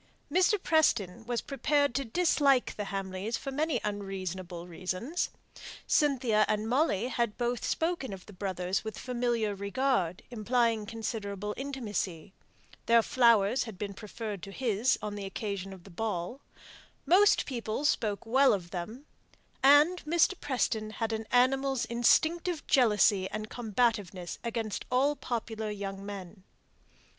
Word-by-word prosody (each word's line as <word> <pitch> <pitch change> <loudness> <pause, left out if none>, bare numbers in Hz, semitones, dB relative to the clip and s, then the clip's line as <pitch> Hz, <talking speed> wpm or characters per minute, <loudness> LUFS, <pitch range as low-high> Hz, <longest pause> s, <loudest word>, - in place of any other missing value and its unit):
Mr. 370 +3 +4
Preston 235 - +2
was 240 -1 -1
prepared 285 0 +1
to 275 - 0
dislike 275 -1 +2
the 205 - -4
Hamleys 195 +3 -3
for 275 - -6
many 295 -1 0
unreasonable 190 -4 -5
reasons. 185 - -3 0.6
Cynthia 255 -8 +3
and 215 +1 0
Molly 245 - +1
had 235 -4 -1
both 240 -1 -1
spoken 325 - -1
of 190 -1 -8
the 210 - -13
brothers 185 -1 -2
with 220 -1 -6
familiar 240 -4 -1
regard, 200 -3 -1
implying 230 -1 +1
considerable 210 -2 -4
intimacy; 210 - -4 0.5
their 230 0 +6
flowers 235 -1 +4
had 220 -5 -9
been 200 0 -4
preferred 210 -1 -6
to 195 - -8
his 235 +1 +1
on 210 -1 -3
the 205 -1 -5
occasion 195 -1 -4
of 190 -2 -11
the 195 - -14
ball; 210 +5 -3 0.6
most 400 +4 +5
people 235 +1 -3
spoke 215 -7 0
well 265 +3 +5
of 175 -4 -4
them; 215 +10 -6 0.6
and 290 +6 +6
Mr. 335 +4 +3
Preston 235 -6 -1
had 225 0 -2
an 220 0 -4
animal's 265 +1 +2
instinctive 315 +8 +2
jealousy 210 -6 +4
and 215 0 -5
combativeness 210 -6 -1
against 230 -3 -3
all 275 +4 +2
popular 225 -4 -4
young 195 -1 -5
men. 200 -1 -8
225 Hz, 135 wpm, -30 LUFS, 200-260 Hz, 0.6 s, their